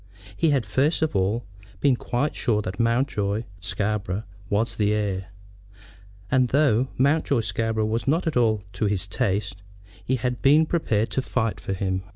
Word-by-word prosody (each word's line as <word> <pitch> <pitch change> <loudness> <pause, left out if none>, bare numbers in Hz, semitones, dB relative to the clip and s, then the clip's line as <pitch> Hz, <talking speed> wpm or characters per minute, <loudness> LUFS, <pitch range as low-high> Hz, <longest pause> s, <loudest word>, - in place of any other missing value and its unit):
He 160 - +2
had, 135 -6 +2
first 140 - +1
of 155 -8 -1
all, 100 +5 0 0.3
been 135 +2 +3
quite 125 +4 -1
sure 105 -3 +1
that 95 0 -5
Mountjoy 115 -3 +1 0.2
Scarborough 100 +1 -2 0.3
was 110 +3 0
the 105 -1 +1
heir; 100 -3 -1 1.0
and 130 -1 +4
though 130 -2 +3
Mountjoy 140 -1 +2
Scarborough 110 +1 -1
was 115 +3 -2
not 160 +6 +2
at 160 - -1
all 110 -4 +2
to 100 +2 -1
his 100 -2 0
taste, 95 -1 -2 0.4
he 130 - 0
had 125 0 -2
been 150 +4 +5
prepared 115 -10 0
to 130 - 0
fight 115 -4 -1
for 95 - -4
him. 95 -1 -1
110 Hz, 165 wpm, -24 LUFS, 100-130 Hz, 1.0 s, been